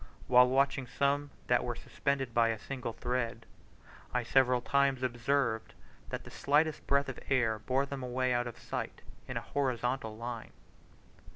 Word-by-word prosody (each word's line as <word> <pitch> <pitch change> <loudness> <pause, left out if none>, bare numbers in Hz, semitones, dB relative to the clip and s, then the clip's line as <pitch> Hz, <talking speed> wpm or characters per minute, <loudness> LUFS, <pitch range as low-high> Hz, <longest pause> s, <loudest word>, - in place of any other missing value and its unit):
While 125 0 +6
watching 135 0 +2
some 140 +3 +1 0.2
that 125 -1 +3
were 120 -1 -2
suspended 135 -2 -2
by 115 0 +4
a 115 -1 0
single 125 +1 -5
thread, 120 -2 -2 0.7
I 125 - +2
several 125 +1 +4
times 135 +1 +2
observed 120 -1 0 0.3
that - - -4
the - - -11
slightest 150 +2 +1
breath 140 0 +3
of 135 - -5
air 115 -5 +2
bore 130 +5 +1
them 140 -1 -5
away 125 0 0
out 120 0 +1
of 120 - -7
sight, - - -5 0.2
in - - -3
a - - -1
horizontal 125 -4 -1
line. 115 -1 -6
125 Hz, 160 wpm, -32 LUFS, 120-140 Hz, 0.7 s, While